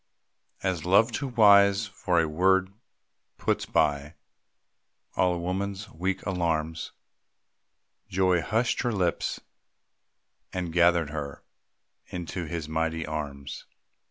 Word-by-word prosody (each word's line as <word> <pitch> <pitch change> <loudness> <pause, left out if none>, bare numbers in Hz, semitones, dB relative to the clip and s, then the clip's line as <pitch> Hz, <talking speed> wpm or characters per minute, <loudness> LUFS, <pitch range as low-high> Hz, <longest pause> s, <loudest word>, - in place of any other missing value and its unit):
As 90 -4 -1
love, 100 +6 +4
too 140 +4 -3
wise 100 -3 +5
for 90 -3 0
a 80 - +2
word, 95 +4 +2 0.6
puts - - -1
by 75 0 +1 1.0
All 90 -1 +2
a - - -3
woman's 95 +3 -3
weak 95 +4 -3
alarms, 80 -4 -1 1.2
Joy 90 -2 +2
hushed 115 +7 0
her 120 - 0
lips, 90 -6 -1 1.1
and 90 -3 -4
gathered 85 -3 +3
her 75 -2 -6 0.6
Into 90 0 -5
his 80 -1 -4
mighty 80 +1 -1
arms. 75 -3 -6
90 Hz, 105 wpm, -27 LUFS, 80-95 Hz, 1.2 s, wise